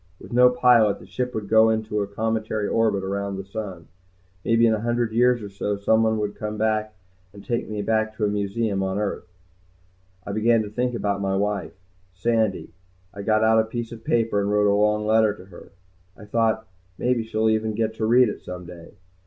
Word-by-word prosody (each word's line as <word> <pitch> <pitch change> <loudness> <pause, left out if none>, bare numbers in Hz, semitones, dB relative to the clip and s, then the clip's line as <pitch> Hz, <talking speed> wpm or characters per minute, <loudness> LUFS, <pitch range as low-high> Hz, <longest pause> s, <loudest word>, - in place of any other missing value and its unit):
With - - -11
no 125 +1 +6
pilot, 125 -4 +4
the - - -14
ship 125 0 -4
would 105 -2 -4
go 110 +1 +5
into 110 -1 -1
a 100 - -2
cometary 110 0 -2
orbit 110 -4 +1
around 100 +1 -3
the 95 - -6
sun. 95 -4 -7 0.6
Maybe 115 0 +3
in 115 - +4
a 110 - -1
hundred 120 0 0
years 120 0 +2
or 100 - -6
so 100 +1 -3
someone 110 +2 +2
would 105 -1 -2
come 105 0 -5
and 100 -3 -4
take 120 - -2
me 105 -1 -3
back 110 0 0
to 110 - -1
a - - +2
museum 100 0 -1
on 95 0 -2
earth. 100 -4 -3 1.0
I - - -5
began 110 +2 +2
to 105 - -8
think 125 +2 -1
about 100 -3 -1
my 95 -1 0
wife, 100 -1 -2 0.4
Sandy. 110 -4 0 0.4
I 100 - -7
got 110 +1 +2
out 110 0 +4
a - - +4
piece 115 +1 -5
of 115 -1 -10
paper 115 -4 +1
and 100 - -1
wrote 105 0 +2
a 100 - +4
long 105 +1 +2
letter 110 -1 +3
to 90 - -14
her. 95 0 -14 0.5
I 105 - -12
thought, 110 +1 0 0.3
maybe 125 -2 0
she'll 110 0 0
even 110 0 -1
get 110 0 -1
to 110 - -1
read 125 +2 +5
it 105 - -5
some 90 0 -8
day. 85 -1 -12
110 Hz, 205 wpm, -23 LUFS, 100-115 Hz, 1.0 s, no